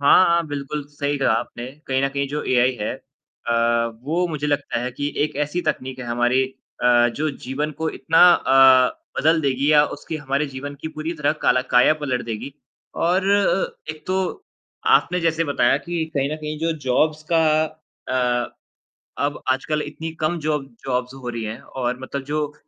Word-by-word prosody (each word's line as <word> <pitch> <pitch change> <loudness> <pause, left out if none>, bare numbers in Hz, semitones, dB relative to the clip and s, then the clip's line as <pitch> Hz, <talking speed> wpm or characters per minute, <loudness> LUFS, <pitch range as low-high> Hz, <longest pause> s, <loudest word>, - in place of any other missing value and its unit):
हाँ, 145 +6 +6
हाँ, 170 -1 +2
बिल्कुल 145 0 -4
सही 145 0 -2
कहा 135 -4 +3
आपने। 120 +1 -3 0.2
कहीं 130 0 0
न 140 - +2
कहीं 140 0 -2
जो 150 +2 -3
एआई 125 0 +3
है 105 - -1 0.5
अ, 120 - +1 0.5
वो 165 +6 0
मुझे 150 -2 -3
लगता 145 -4 -1
है 125 +1 -3
कि 145 +3 -3
एक 150 - -5
ऐसी 150 +5 -3
तकनीक 130 -3 -3
है 125 - -6
हमारी 120 +2 +2
अ, 125 -2 +1
जो 150 +6 -2
जीवन 145 +4 -2
को 160 0 -1
इतना 165 - +1
अ, 130 -3 +5 0.2
बदल 160 +2 +3
देगी 140 0 +1
या 150 -1 +6
उसकी 160 - -6
हमारे 140 0 -1
जीवन 140 +1 -7
की 160 - -4
पूरी 160 +1 -4
तरह 150 - +1
काला 130 - +3
काया 125 +5 +6
पलट 140 -5 -2
देगी 115 +4 -5 0.5
और 185 +3 +2
अ, 200 -4 +1
एक 155 0 -11
तो, 190 - -2 0.4
आपने 180 - +4
जैसे 165 0 +1
बताया 140 -4 +2
कि 165 +3 -3
कहीं 140 0 0
न - - -3
कहीं 155 0 -5
जो 165 +1 0
जॉब्स 155 +4 +2
का 165 -1 +5 0.7
अ, 125 -1 0 0.7
अब 145 0 -2
आजकल 150 +4 -1
इतनी 160 +2 -6
कम 155 +2 0
जॉब 150 -2 -1 0.2
जॉब्स 125 -1 -1
हो 125 - -3
रही 115 -1 -4
हैं 110 +2 -5
और 125 -1 -3
मतलब 140 +1 -4
जो 150 0 -2
145 Hz, 185 wpm, -22 LUFS, 130-155 Hz, 0.7 s, हाँ